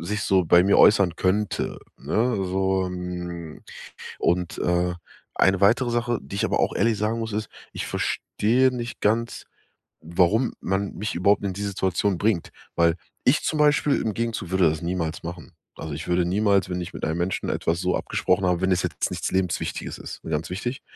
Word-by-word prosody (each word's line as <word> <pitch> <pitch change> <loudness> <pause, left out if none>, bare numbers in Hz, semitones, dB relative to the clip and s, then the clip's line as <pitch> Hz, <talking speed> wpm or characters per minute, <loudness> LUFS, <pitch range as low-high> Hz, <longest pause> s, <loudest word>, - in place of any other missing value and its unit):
sich 100 +5 -3
so 95 -3 +3
bei 85 +3 +6
mir 100 - +4
äußern 95 -6 +5
könnte, 100 +2 0 0.2
ne? 120 +1 0
So, 95 0 0
hm, 90 -2 -6 0.6
und, 90 0 0
äh, 90 0 +1 0.4
eine 95 -1 +3
weitere 120 +5 +4
Sache, 120 0 0
die 100 - -7
ich - - 0
aber - - 0
auch - - +1
ehrlich 115 -2 +2
sagen 110 +3 0
muss, 110 -1 -4
ist: 105 0 -2 0.2
Ich - - -4
verstehe 125 +5 +1
nicht 120 -1 -5
ganz, 115 +3 0 0.6
warum 90 +9 +2
man 95 +1 -1
mich 105 +4 -3
überhaupt 100 +3 +2
in 95 - -2
die 100 - -5
Situation 95 -1 0
bringt. 100 -5 0 0.3
Weil, 85 -1 +4 0.3
ich 130 +5 +4
zum 155 - -1
Beispiel 150 -1 +3
im 110 - -1
Gegenzug 115 -6 -3
würde 95 -3 +4
das 80 +1 -4
niemals 85 -2 -2
machen. 85 -3 -8 0.2
Also, 80 -2 -6
ich 80 +4 -7
würde 90 0 +2
niemals, 100 0 +2
wenn 90 - -2
ich 90 - -7
mit - - -4
einem 80 - -1
Menschen 90 +2 -2
etwas 85 +1 -1
so 90 0 0
abgesprochen 90 +1 0
habe 90 -1 +1
wenn 95 - +2
es 90 0 +1
jetzt 85 -4 -2
nichts - - -3
Lebenswichtiges 95 -2 -2
ist, - - -9
ne, - - -6
ganz 80 +2 -2
wichtig 120 +8 -4
95 Hz, 190 wpm, -24 LUFS, 90-105 Hz, 0.6 s, bei